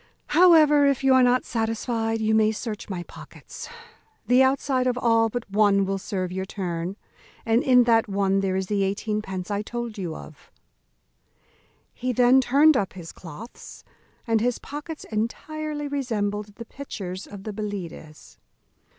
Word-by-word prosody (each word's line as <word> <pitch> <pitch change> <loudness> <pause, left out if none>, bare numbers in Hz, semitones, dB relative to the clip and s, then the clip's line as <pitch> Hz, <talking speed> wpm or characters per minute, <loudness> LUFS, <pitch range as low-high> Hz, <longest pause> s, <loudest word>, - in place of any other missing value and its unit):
However, 305 -3 +6
if 275 -1 +1
you 270 -1 +5
are 260 - +6
not 250 0 +3
satisfied, 225 0 -1
you 220 0 +1
may 220 0 +4
search 215 -1 -6
my 180 -3 -4
pockets; - - -11 0.6
the 250 +2 +4
outside 265 -1 +2
of 250 -1 0
all 230 -2 +3
but 240 +1 -5
one 200 -1 +3
will 195 0 -2
serve 185 -2 -3
your 190 +1 -3
turn, 180 -1 -4 0.5
and 230 +2 +3
in 250 -2 +5
that 230 -1 +3
one 195 0 +1
there 190 -1 0
is 190 0 -1
the 200 +1 -1
eighteen 210 +2 -1
pence 190 -1 -6
I 205 0 -1
told 235 0 -5
you 170 -4 -4
of." 155 - -13 1.4
He 255 +1 -2
then 250 +2 +5
turned 285 +5 +5
up 200 -6 -1
his 175 -3 -9
cloaths; 185 +8 -11 0.4
and 225 -3 +1
his 245 +1 0
pockets 300 +2 -8
entirely 295 +7 -3
resembled 210 -7 -3
the 230 - -9
pitchers 195 -9 -7
of 200 -2 -10
the 215 - -5
Belides. 195 -7 -7
220 Hz, 160 wpm, -24 LUFS, 195-255 Hz, 1.4 s, However